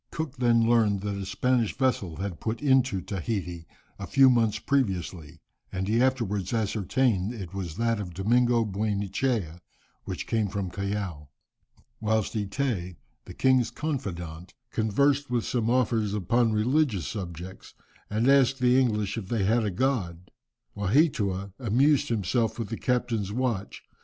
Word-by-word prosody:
Cook 155 -4 -5
then 115 -2 +3
learned 110 -4 +3
that 100 0 -3
a 100 -1 -5
Spanish 120 +2 0
vessel 120 -11 0
had 95 -1 -5
put 110 +1 -3
into 130 -8 +2
Tahiti 95 -3 -4 0.3
a - - -5
few 135 -1 +6
months 115 -3 +2
previously, 95 - -2 0.3
and 95 +1 -3
he 115 +3 +2
afterwards 115 -7 0
ascertained 110 0 0
that 115 - -7
it 90 -1 -8
was 90 -5 -5
that 115 -1 +1
of 90 -4 -6
Domingo 120 +4 +2
Buenechea, 100 -2 -1 0.4
which - - -4
came 110 -2 0
from 95 -2 -4
Callao. 100 -6 -4 0.7
Whilst 110 -1 0
Eteé, 105 -4 -2 0.3
the - - -10
king's 130 -2 +3
confidant, 90 - -5 0.2
conversed 140 +6 +1
with 120 -2 0
some 115 -2 0
officers 115 -4 +1
upon 115 +4 +2
religious 110 - +1
subjects, 90 -2 -7 0.3
and 110 +4 0
asked 135 -1 +5
the 125 0 +4
English 105 -3 0
if 95 - -8
they 110 -1 0
had 115 +4 +2
a 105 - 0
god, 95 -6 -2 0.4
Waheatua 100 - +1
amused 135 +5 +2
himself 115 +1 0
with 115 -4 -4
the 115 - -3
captain's 115 -5 -1
watch. 115 -4 -2
110 Hz, 145 wpm, -27 LUFS, 95-125 Hz, 0.7 s, few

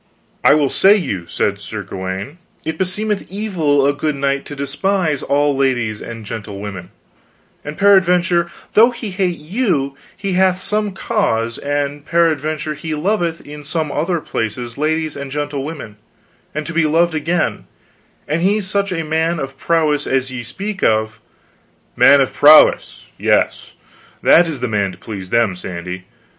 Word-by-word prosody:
I - - +6
will 145 -3 +1
say 195 +2 +5
you, 100 - -3
said 100 +3 -1
Sir 105 +1 -6
Gawaine, 95 - -6 0.3
it 160 - -4
beseemeth 200 +2 -2
evil 170 -9 +1
a 140 - +3
good 150 0 -2
knight 140 0 -1
to 145 - -8
despise 150 +2 -1
all 145 0 +1
ladies 120 -6 0
and 115 -2 -8
gentlewomen, 100 -4 -7 0.7
and 150 +1 -7
peradventure 180 -3 +4 0.2
though 230 +3 +7
he 235 -4 -6
hate 185 -2 -1
you 155 - -1 0.2
he 195 -1 -3
hath 185 0 +3
some 210 +1 -1
cause, 115 -9 -1
and 145 0 -2
peradventure 155 -2 0
he 155 +1 -5
loveth 170 0 -1
in 150 0 -9
some 155 0 -2
other 170 +4 -1
places 115 -3 -4
ladies 155 +1 -1
and 140 -1 -6
gentlewomen, 145 -5 -5 0.6
and 150 0 -3
to 165 - -6
be 165 -1 +2
loved 165 +2 +2
again, 160 +2 -1 0.6
and 155 +3 -1
he 200 +4 +2
such 200 0 -1
a 165 -2 -2
man 160 +2 0
of 135 -1 -5
prowess 150 -1 +1
as 130 0 0
ye 130 -1 -5
speak 195 - -5
of 110 0 +1 0.4
" - - -39
"Man 140 0 +7
of 130 - 0
prowess 150 +2 +5
yes, - - 0 0.5
that 170 0 +6
is 155 -5 -5
the 125 - 0
man 100 -4 -1
to - - -13
please 95 -2 -8
them, 115 -4 +2
Sandy. 90 +1 -7
150 Hz, 155 wpm, -18 LUFS, 130-175 Hz, 0.7 s, though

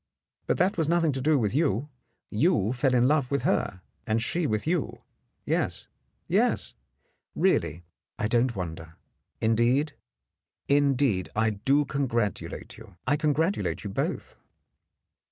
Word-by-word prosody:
But - - +1
that 180 +1 +1
was 160 -2 +1
nothing 165 -2 +3
to 135 -1 -3
do 150 +2 +3
with 110 -5 0
you. 140 - +1 0.4
You 115 - +2
fell 130 0 +1
in 125 0 +4
love 145 -3 +2
with 140 0 -1
her, 95 -1 0 0.2
and 110 0 +2
she 160 +8 -1
with 110 -3 -1
you. 165 -2 -1 0.4
Yes, - - -1 0.4
yes. - - +1 0.6
Really, 85 +4 +1 0.3
I 110 -2 0
don't 120 +1 +1
wonder. 80 -3 -6 0.5
Indeed 120 +7 +2 0.4
— - - -63 0.2
indeed, 135 - +2
I 110 +1 +2
do 135 +8 +2
congratulate 120 -9 -2
you 105 -6 -15
— - - -47
I 145 - +3
congratulate 155 +5 0
you 100 - -5
both." - - -3
125 Hz, 140 wpm, -27 LUFS, 110-145 Hz, 0.6 s, in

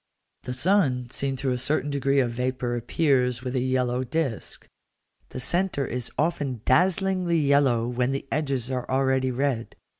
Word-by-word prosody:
The 125 - -3
sun 130 -6 +1
seen 135 -1 -1
through 135 0 -1
a 125 - -1
certain 145 +3 0
degree 140 0 +1
of 120 -2 -1
vapour 125 0 -2
appears 125 -1 +1
with 130 0 -3
a - - +2
yellow 125 0 0
disk; 135 -3 -3 0.6
the - - -6
centre 175 +1 0
is 125 0 -3
often 145 -7 -1
dazzlingly 180 +3 +2
yellow 140 -6 +3
when 125 +1 0
the 135 0 -3
edges 135 -4 -1
are 125 -1 -3
already 130 0 +1
red. 130 -2 -2
130 Hz, 155 wpm, -25 LUFS, 125-145 Hz, 0.6 s, yellow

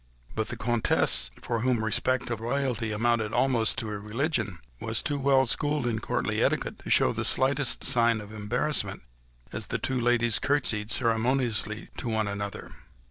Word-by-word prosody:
But 110 0 -2
the 120 - -3
Comtesse, 115 - +2
for 115 -2 -1
whom 120 -2 +1
respect 125 +3 0
of 115 - -2
royalty 120 -2 -1
amounted 115 0 0
almost 120 -3 +2
to 110 -2 -3
a 105 - -4
religion, 110 - -2 0.2
was - - -1
too 145 -1 -1
well 135 -1 +4
schooled 145 +2 0
in 115 -2 -1
courtly - - -1
etiquette - - 0
to - - -9
show - - +5
the - - -2
slightest 135 0 +1
sign 120 -4 +2
of 105 0 -10
embarrassment, 105 - -1 0.5
as - - -5
the - - -1
two 130 -1 -1
ladies 120 -1 +3
curtsied 115 -7 0
ceremoniously 115 -2 0
to 120 - -4
one 110 -1 0
another. 100 0 -5
115 Hz, 165 wpm, -27 LUFS, 110-130 Hz, 0.5 s, show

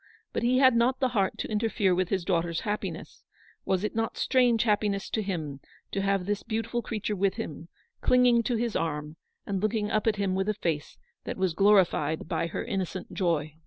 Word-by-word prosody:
But - - -1
he 245 +2 +3
had 260 -2 +6
not 245 +3 +2
the 260 - +2
heart 210 -3 0
to - - -3
interfere 210 -3 +1
with 180 0 0
his 190 -3 -1
daugh 175 -3 +2
ter's 170 -1 -3
happiness 210 -1 -5 0.2
— - - -30
was 190 0 +1
it 215 - -2
not 225 0 -1
strange 245 -3 +3
happiness 205 -3 0
to 220 - 0
him 160 -8 -4 0.3
to 195 - -1
have 195 -2 +1
this 205 +1 -1
beautiful 225 +2 -2
creature 215 -2 -3
with 195 0 +1
him, 170 -8 -6 0.3
clinging 250 -2 +4
to 245 - +1
his 230 -1 -1
arm, 150 -1 -2 0.3
and 195 -2 -2
looking 215 0 0
up 215 +1 +1
at 220 - +3
him 200 -2 0
with 190 +2 0
a 215 - 0
face 160 -6 -3 0.3
that - - -4
was 185 -3 +1
glorified 180 -6 +3
by 165 - -1
her 170 - -4
innocent 190 -4 -4
joy. 155 -4 -1
200 Hz, 205 wpm, -28 LUFS, 180-225 Hz, 0.3 s, had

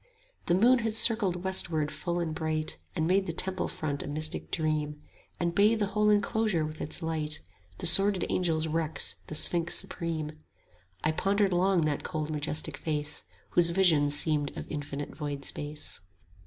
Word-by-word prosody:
The 175 - +3
moon 240 +6 +4
had 225 -1 -1
circled 210 -6 +3
westward 165 -5 +2
full 175 0 -3
and 165 -2 -2
bright, 155 -1 -3 0.2
And 160 -3 0
made 190 +3 +1
the 165 - -3
temple 185 +2 -2
front 145 -2 -4
a - - -7
mystic 155 +2 -3
dream, 150 -2 -2 0.4
And 170 -1 -1
bathed 210 +4 +3
the 205 - +1
whole 210 0 +2
enclosure 210 -4 +1
with 155 0 -8
its 155 - -2
light, 155 -2 -1 0.3
45 - - -26
The - - -5
sworded 195 -1 +6
angel's 160 -3 0
wrecks, 160 0 0
the 155 - -5
sphinx 170 +2 +2
supreme: 155 -2 -3 0.6
I 155 - +2
pondered 195 +3 +1
long 185 0 +2
that 150 -2 -1
cold 155 -2 -4
majestic 150 0 -3
face 150 -1 -3 0.3
Whose 175 -1 +3
vision 170 -5 +3
seemed 145 -1 +2
of - - -6
infinite 145 -1 -6
void 145 -2 -5
space. 150 -9 -5
160 Hz, 170 wpm, -28 LUFS, 150-185 Hz, 0.6 s, sworded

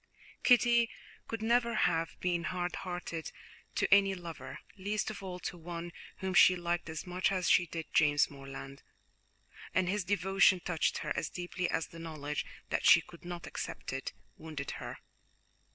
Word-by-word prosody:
Kitty 240 -2 +5 0.4
could 225 -1 -4
never 235 +1 +3
have 165 -1 +1
been 175 -2 0
hard 180 +1 -2
hearted 175 -3 -5 0.4
to - - +3
any 195 -1 +5
lover, 165 -7 -8 0.2
least 205 +3 -2
of 210 - -8
all 185 -2 -5
to 175 - -5
one 170 +1 -6 0.3
whom 190 0 -3
she 185 0 +8
liked 175 -1 -2
as 160 +2 -5
much 180 +1 0
as 185 -2 0
she 175 - +5
did 165 -1 -5
James 145 -2 +5
Morland, 135 0 -9 0.9
and 185 0 +3
his 205 +2 0
devotion 195 0 +4
touched 170 -2 0
her - - 0
as 160 - -1
deeply 180 0 -3
as 165 - 0
the 165 - -11
knowledge 150 -3 -4 0.2
that - - 0
she - - +9
could 170 - -15
not 175 -1 -6
accept - - -5
it 135 - -3 0.3
wounded 150 -3 -5
her. - - -6
175 Hz, 165 wpm, -32 LUFS, 160-190 Hz, 0.9 s, she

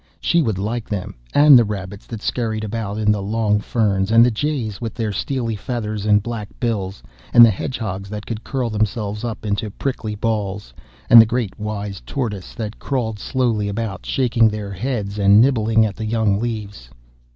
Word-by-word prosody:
She 170 - +2
would 110 - -1
like 110 +4 -3
them, 100 -4 -4 0.2
and 145 -3 +8
the - - +4
rabbits 100 -2 -6
that 110 -2 -7
scurried 110 -3 -2
about 105 -1 -4
in 105 -1 +2
the 105 -1 0
long 105 +1 +1
fern, 105 -3 0
and 115 +1 +6
the 125 - +2
jays 120 -4 -2
with 115 -2 -4
their 110 -3 -2
steely 115 +2 -2
feathers 105 -1 -4
and 105 -1 +4
black 115 -3 -5
bills, 100 - -2 0.3
and 120 - +11
the 115 - +4
hedgehogs 100 -2 -4
that 105 0 -6
could 115 -1 -5
curl 125 -4 -2
themselves 105 0 -2
up 115 -2 -5
into 105 +1 -1
prickly 110 -1 -4
balls, 105 -2 -3 0.3
and 115 - +10
the 110 - +3
great 120 -5 -2
wise 105 -2 -4
tortoises 105 -9 -4
that 110 -3 -5
crawled 115 -6 -2
slowly 115 -3 0
about, 105 -1 -4
shaking 120 -4 +2
their 105 -2 -5
heads 105 0 -3
and 100 +1 +6
nibbling 115 -3 +3
at 105 - -3
the 110 - -5
young 110 -3 +1
leaves. 105 - -5
110 Hz, 185 wpm, -20 LUFS, 100-115 Hz, 0.3 s, and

